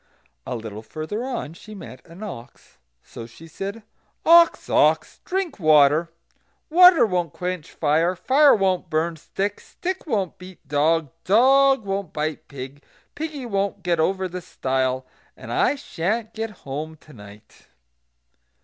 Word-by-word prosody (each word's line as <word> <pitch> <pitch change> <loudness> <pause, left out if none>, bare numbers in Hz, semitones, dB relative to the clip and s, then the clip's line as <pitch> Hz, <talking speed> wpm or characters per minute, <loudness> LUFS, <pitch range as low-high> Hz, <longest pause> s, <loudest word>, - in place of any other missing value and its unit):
A - - -3
little 110 -2 -7
further 155 - -5
on 245 - -4
she 210 +5 -12
met 130 -9 -11
an 170 +5 -11
ox. 120 - -10 0.2
So 115 - -10
she 140 +8 -15
said: 200 +7 -6 0.4
"Ox! 335 0 +6
ox! - - +2
drink 365 - -2
water; 155 0 +5 0.6
water 360 -3 +8
won't 180 -6 -1
quench 180 -3 -4
fire; 160 +4 +1
fire 275 +9 +5
won't 185 -4 0
burn 165 +1 0
stick; 200 +6 -3
stick 370 -1 -6
won't 200 - -2
beat 180 -4 -13
dog; 150 +1 +1
dog 265 +4 +4
won't 195 -3 -3
bite 155 0 -3
pig; 140 +1 -9 0.3
piggy 300 -4 -5
won't 200 -3 -2
get 175 -2 0
over 190 +3 +1
the 180 0 -6
stile; 130 -5 -2 0.3
and - - -7
I - - +2
sha'n't 220 - -3
get 225 0 -3 0.2
home 150 +4 -5
to 155 0 -18
night." 105 -2 -15
180 Hz, 140 wpm, -23 LUFS, 150-220 Hz, 0.6 s, water